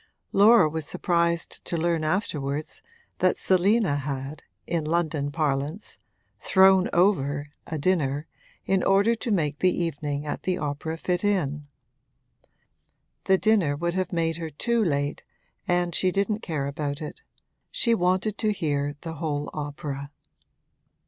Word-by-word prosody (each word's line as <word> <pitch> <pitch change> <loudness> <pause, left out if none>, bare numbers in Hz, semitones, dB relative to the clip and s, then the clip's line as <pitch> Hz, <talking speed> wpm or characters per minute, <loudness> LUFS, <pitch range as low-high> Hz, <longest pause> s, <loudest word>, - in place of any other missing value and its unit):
Laura 210 -2 +6
was 155 -1 -3
surprised 170 0 0
to 170 - -3
learn 165 -1 0
afterwards 155 -4 -2 0.4
that - - +3
Selina 190 -3 +3
had, 140 +1 -5 0.2
in 170 -2 -1
London 155 -2 0
parlance, 150 +5 -2 0.4
'thrown 190 -1 +5
over' 145 -6 +1 0.2
a 160 - -3
dinner 150 -3 0 0.4
in 190 -1 +2
order 200 +4 +4
to 230 +1 -4
make 150 -8 0
the 185 - +4
evening 145 -2 -3
at 145 - -4
the 185 -1 -1
opera 150 +2 -3
fit 180 +2 -1
in. 150 -8 0 1.6
The 190 - +4
dinner 195 -9 +2
would 170 +3 -2
have 185 0 -1
made 165 -2 0
her 165 -1 -5
too 235 - 0
late, 145 -4 -1 0.4
and 175 -1 +1
she 185 - +3
didn't 200 +3 0
care 155 -9 -3
about 140 0 -3
it: 155 - -7 0.5
she 235 - +1
wanted 185 +1 +1
to 215 -2 +2
hear 145 -6 -1
the 165 - -5
whole 145 -2 -2
opera. 145 -1 -5
165 Hz, 135 wpm, -26 LUFS, 145-185 Hz, 1.6 s, Laura